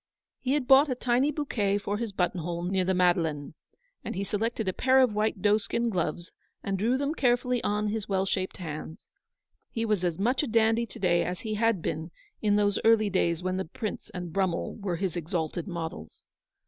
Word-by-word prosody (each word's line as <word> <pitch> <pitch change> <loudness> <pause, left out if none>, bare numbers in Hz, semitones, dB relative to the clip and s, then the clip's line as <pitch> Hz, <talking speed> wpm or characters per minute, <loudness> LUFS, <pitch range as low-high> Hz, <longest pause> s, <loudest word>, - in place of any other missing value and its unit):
He 260 +1 0
had. 285 -4 0
bought 275 +3 +7
a 255 - 0
tiny 250 +3 +2
bouquet 230 -9 0
for 205 0 -2
his 230 -3 -3
button 180 -1 0
hole 170 +1 -3
near 185 +1 +1
the 190 +1 +1
Madeleine, 165 -5 +1 0.5
and - - -5
he 195 - -2
selected 220 +2 -2
a 185 - +1
pair 260 +5 +4
of 255 -4 +4
white 210 -2 -1
doeskin 215 +3 +2
gloves, 175 -2 -2 0.3
and 195 - -1
drew 235 +6 +2
them 285 +2 -1
carefully 245 -3 +1
on 210 0 0
his 215 -1 -3
well 190 -1 +1
shaped 190 -1 -2
hands. 160 -2 -7 0.6
He 225 0 -2
was 210 -5 0
as 175 -3 0
much 245 +7 +1
a 295 - -2
dandy 225 0 +2
to - - -11
day 175 -2 +2
as 180 0 -4
he 220 -2 -3
had 220 -4 +1
been 160 +2 -3 0.3
in 210 -1 +3
those 205 -1 +2
early 220 -2 +4
days 170 -2 +1
when 185 0 -1
the 190 - -2
Prince 215 +6 -5
and 180 -4 -6
Brummel 185 -3 0
were 200 -5 -2
his 180 0 -2
exalted 170 +1 -3
models. 165 - -6
200 Hz, 200 wpm, -28 LUFS, 180-230 Hz, 0.6 s, bought